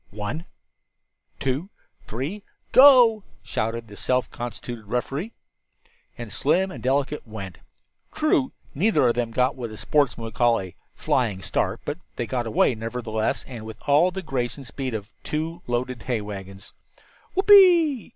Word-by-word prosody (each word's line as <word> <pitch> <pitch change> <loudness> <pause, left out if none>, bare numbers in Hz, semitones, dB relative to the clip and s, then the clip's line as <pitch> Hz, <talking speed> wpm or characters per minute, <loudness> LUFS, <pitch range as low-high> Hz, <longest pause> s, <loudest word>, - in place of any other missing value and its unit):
"One, 110 - -5 0.9
two, 135 +8 -2 0.4
three 145 - -4 0.3
Go!" 250 -6 +7 0.2
shouted 115 +1 -3
the 105 - -12
self 125 +2 0
constituted 120 -1 -6
referee. 135 - -3 0.9
And - - -7
Slim 190 +1 +1
and - - -8
Delicate 140 +1 -1
went! 100 -5 -8 0.5
True, 305 -4 +1 0.2
neither 150 - +3
of 120 - +3
them 120 -1 -1
got 125 +3 +1
what 115 -4 -6
sportsmen 140 -4 +1
would 115 - -7
call 120 +2 +3
"a 95 -2 -7 0.2
flying 105 -7 0
start," - - -1
but - - -4 0.2
they 120 - -2
got 120 -1 -2
away, 110 +3 +3
nevertheless, 115 -1 -2
and 120 -4 -8
with 110 0 -8
all 150 +5 +5
the 190 +1 -6
grace 130 -5 -2
and 140 - -10
speed 130 0 -4
of 105 +1 -7
two 160 +3 -3
loaded 120 0 -2
hay 120 +2 -1
wagons. 95 -1 -9 0.6
"Whoopee!" 360 - +6
125 Hz, 145 wpm, -24 LUFS, 115-165 Hz, 0.9 s, Go